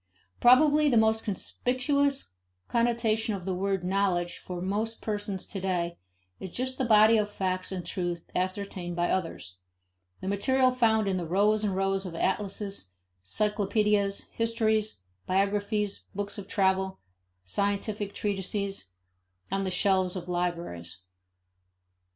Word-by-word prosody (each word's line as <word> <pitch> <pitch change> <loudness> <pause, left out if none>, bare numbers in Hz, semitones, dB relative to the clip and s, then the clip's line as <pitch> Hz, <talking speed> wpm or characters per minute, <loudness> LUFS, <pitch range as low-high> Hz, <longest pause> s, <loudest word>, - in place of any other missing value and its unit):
Probably 295 +4 +6
the 240 - +3
most 220 0 +3
conspicuous 260 - 0 0.3
connotation 230 -2 +1
of 185 -3 -7
the 190 - -1
word 195 0 -1
knowledge 180 -2 0
for 180 -1 -6
most 210 +5 -2
persons 205 -3 -3
to 195 - -6
day 175 -2 -1 0.4
is 190 - -6
just 260 +7 -3
the 260 - +1
body 220 0 +6
of 210 -1 +1
facts 185 -2 -2
and 185 -2 -4
truths 175 -2 -2
ascertained 185 -1 -2
by 175 0 +1
others; 165 - -3 0.6
the - - -6
material 255 +6 +3
found 220 -4 +2
in 190 -1 +1
the 175 -2 -3
rows 210 +5 +3
and 200 -3 0
rows 195 0 0
of 170 - -7
atlases, 195 - -2 0.3
cyclopedias, 205 - +1
histories, 220 - 0 0.3
biographies, 200 +2 0
books 205 +1 -3
of 195 - -8
travel, 190 -1 +1 0.5
scientific 200 - -1
treatises, 195 - -2 0.6
on 195 0 0
the - - 0
shelves 185 0 +2
of 180 -1 -5
libraries. 170 - -3
200 Hz, 130 wpm, -28 LUFS, 185-215 Hz, 0.6 s, Probably